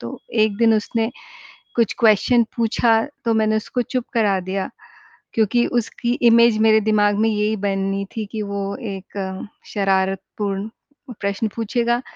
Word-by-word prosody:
तो 115 - -7 0.3
एक 205 -2 -2
दिन 225 -1 +5
उसने 225 +2 -1 0.7
कुछ 230 -3 +2
क्वेस्चन 230 +2 +4
पूछा 225 0 +2 0.3
तो 225 - +3
मैंने 220 0 +2
उसको 245 +3 -2
चुप 250 -2 0
करा 205 -4 +2
दिया 195 0 -2 0.6
क्योंकि 230 +2 +2
उसकी 240 +1 -2 0.2
इमेज 235 -1 +5
मेरे 220 0 +5
दिमाग 205 -1 +2
में 225 - +3
यही 210 +1 0
बनी 195 0 -1
थी 220 - -2
कि 220 -2 -3
वो 200 0 -4 0.3
एक 190 0 -6 0.3
शरारतपूर्ण 195 +1 -1 0.5
प्रश्न 200 +2 -1
पूछेगा। 235 +2 0
215 Hz, 140 wpm, -21 LUFS, 200-230 Hz, 0.7 s, दिन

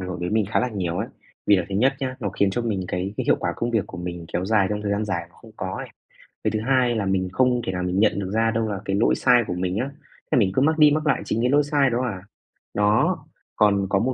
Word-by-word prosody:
hưởng 90 -1 -5
đến 90 +2 -2
mình 110 - +3
khá - - +2
là 125 - 0
nhiều 90 -6 -3
ấy. - - -2 0.4
Vì 100 - +6
là 90 - +1
thứ 95 - -5
nhất 130 +7 +3
nhá, 130 -1 -3
nó 100 - -1
khiến 100 0 +1
cho 120 +5 -2
mình 105 -5 -1
cái 95 +3 -3
cái - - -2
hiệu - - +4
quả 85 - -1
công 120 +4 -2
việc 110 -4 0
của 90 - -9
mình 90 -1 -5
kéo 90 +2 -1
dài 105 -1 +3
trong 105 0 -2
thời 105 - -2
gian 105 +1 0
dài 85 -4 -3
mà - - -28
không 115 - -14
có 95 0 -4
ấy. - - -6 0.6
Cái - - +1
thứ 110 - -1
hai 125 -3 +3
là 105 -3 -1
mình 95 -1 0
không 125 +2 +2
thể - - -1
nào 90 -1 -3
mình 90 +2 0
nhận 105 -1 +3
được 95 -1 -4
ra 115 +1 +2
đâu 115 -1 0
là 100 - -3
cái 95 - -1
lỗi 105 - +3
sai 120 -1 +4
của - - -2
mình 90 +1 -1
á, 130 +5 -1 0.4
thế - - +3
mình 100 -5 +3
cứ 130 - +2
mắc 160 +2 +2
đi 150 -2 +7
mắc 155 +1 0
lại 150 - +2
chính 115 - -1
cái 125 - +2
lỗi 145 +1 +4
sai 145 -2 +2
đó 120 +1 0
à. 100 -7 -3 0.5
Đó, 105 +1 +2 0.4
còn 100 -2 +3
có 100 -1 +2
một, 130 +4 0
105 Hz, 300 wpm, -23 LUFS, 95-120 Hz, 0.6 s, đi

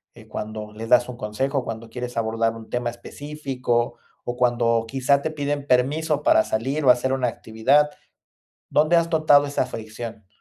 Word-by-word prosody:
eh, - - -15
cuando 105 0 -6
les 115 +1 -7
das 125 -1 +5
un 125 - -7
consejo, 130 +6 -2
cuando 115 0 -6
quieres 125 +1 -6
abordar 115 0 0
un 110 -1 -11
tema 120 -1 -1
específico 125 -1 -3 0.3
o 120 - -3
cuando 120 -2 +2
quizá 135 +2 +2
te 160 - -2
piden 145 -1 -3
permiso 145 +4 +1
para 110 - +5
salir 135 +7 -2
o - - +6
hacer 125 +1 +4
una 130 -2 +1
actividad. 130 +7 +2 0.8
¿Dónde 155 +3 +4
has 170 0 +2
notado 150 -3 +5
esa 145 - -1
fricción? 110 -1 -8
125 Hz, 165 wpm, -23 LUFS, 115-145 Hz, 0.8 s, o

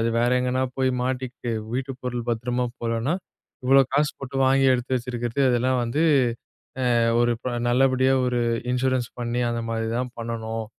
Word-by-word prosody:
அது 115 - +1
வேற 120 +1 +2
எங்கனா 125 +1 0 0.2
போய் 130 -1 +2
மாட்டிக்கிட்டு 125 -2 -3 0.2
வீட்டு 135 +1 -2
பொருள் 125 -1 -4
பத்திரமா 120 +2 -1 0.2
போகலனா, 115 +6 0 0.5
இவ்ளோ 135 +1 +6
காசு 145 +1 +2
போட்டு 135 0 -6
வாங்கி 135 +1 +4
எடுத்து 125 +1 -2
வச்சிருக்கிறது 120 +1 -3
இதெல்லாம் 125 +1 +1
வந்து, 120 +6 -1 1.0
அ, - - +4 0.2
ஒரு 120 0 +3
ப 125 - -3 0.2
நல்லபடியா, 130 +1 +3
ஒரு 125 -1 0 0.3
இன்சூரன்ஸ் 125 -1 0
பண்ணி 120 0 -2
அந்த 115 0 -2
மாரி 115 0 -2
தான் 125 0 -3
பண்ணனும் 115 -1 -4
125 Hz, 155 wpm, -24 LUFS, 120-130 Hz, 1.0 s, இவ்ளோ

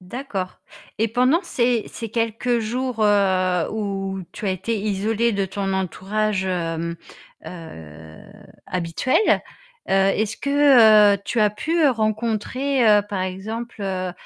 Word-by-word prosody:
D'accord 190 -2 -6 0.4
et 225 - +1
pendant 255 +8 +2
ces 240 - 0
ces 230 - -7
quelques 230 +2 -1
jours, 240 +1 -2
heu, 185 -4 +2
où 195 -3 -3
tu 210 - -7
as - - +1
été 215 +5 -2
isolée 215 +3 0
de 200 -1 0
ton 195 0 -3
entourage, 190 +2 -1
hem, 170 -2 -2 0.5
heu, 80 - -11 0.5
habituel, 180 +7 -1 0.7
heu, - - -1
est-ce 195 +3 +1
que 235 -8 +6
tu 235 - -1
as 210 - +4
pu 320 +10 0
rencontrer 225 +1 +1
par 190 -2 -2
exemple, 215 +5 -6
heu, 185 -2 -3
210 Hz, 120 wpm, -22 LUFS, 190-230 Hz, 0.7 s, que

